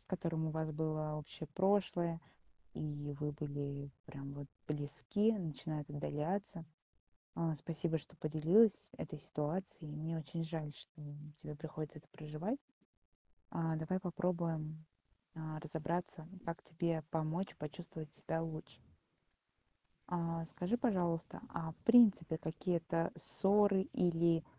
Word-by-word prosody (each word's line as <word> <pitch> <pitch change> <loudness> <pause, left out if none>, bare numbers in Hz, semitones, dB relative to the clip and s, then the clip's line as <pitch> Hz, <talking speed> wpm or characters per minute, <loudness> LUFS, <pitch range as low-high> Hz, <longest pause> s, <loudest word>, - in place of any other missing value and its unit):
с - - -17
которым 165 -3 0
у - - +1
вас 160 0 -1
было 155 0 0
общее 150 +1 -6
прошлое, 185 -4 +3 0.5
и 145 -1 -3
вы 150 -1 0
были 140 -1 -3
прям 140 0 -6
вот 145 0 -6 0.2
близки, 150 +9 +2
начинает 155 -3 -3
отдаляться. 165 +5 -1 0.7
А, 165 -2 +1
спасибо, 160 +2 0
что 150 - -14
поделилась 165 +8 +5
этой 155 0 -5
ситуацией. 155 +2 -3
Мне 155 +2 -2
очень 165 +1 -3
жаль, 160 -2 -3
что 155 +1 -12 0.4
тебе 150 - -5
приходится 155 0 -5
это 150 - -18
проживать. 160 - -3 0.9
А, 165 -1 +1
давай 160 +4 0
попробуем, 165 -4 -1 0.5
а, 155 -1 -4
разобраться, 160 +1 -2 0.2
как 165 0 -3
тебе 165 -1 0
помочь 160 +4 0
почувствовать 155 0 -6
себя 165 - -2
лучше. 160 -1 -5 1.3
А, 165 -1 0
скажи, 180 +7 +1
пожалуйста, 180 -9 +1
а 160 -1 -3
в - - -21
принципе 215 -9 +8
какие-то 165 +1 0
ссоры 200 -1 +4
или 170 -2 +4
160 Hz, 120 wpm, -38 LUFS, 155-175 Hz, 1.3 s, принципе